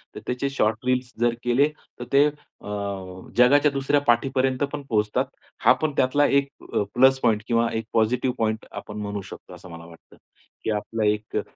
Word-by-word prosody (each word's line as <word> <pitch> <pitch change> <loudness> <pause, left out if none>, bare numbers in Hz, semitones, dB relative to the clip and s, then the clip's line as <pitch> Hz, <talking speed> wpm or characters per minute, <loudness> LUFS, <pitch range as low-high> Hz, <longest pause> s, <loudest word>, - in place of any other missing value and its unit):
तर - - -6
त्याचे 125 +2 -1
short 110 -3 0
reels 125 -1 0
जर 120 0 +2
केले 125 +4 +3 0.3
तर - - -4
ते 140 +1 +7
अ, 145 -7 -10 0.7
जगाच्या 140 +4 +5
दुसऱ्या 140 +1 +1
पाठीपर्यंत 130 +2 +2
पण 145 - -3
पोहोचतात. 105 -1 +1 0.4
हा - - +6
पण 155 -1 +1
त्यातला 145 +3 +3
एक 140 0 +2 0.3
अ, - - +2
प्लस 130 +1 +5
पॉइंट 110 -3 +2
किंवा 115 -1 +2
एक 110 -1 -2
पॉझिटिव्ह 125 +3 +1
पॉइंट 110 0 -1
आपण 105 - -8
म्हणू 100 -1 -4
शकतो - - -11
असं 90 - -12
मला 85 0 -10
वाटतं 85 -1 -17 0.5
की - - -2
आपलं 110 +1 -2
एक 105 0 -1
अ, - - +1
125 Hz, 180 wpm, -24 LUFS, 110-135 Hz, 0.7 s, ते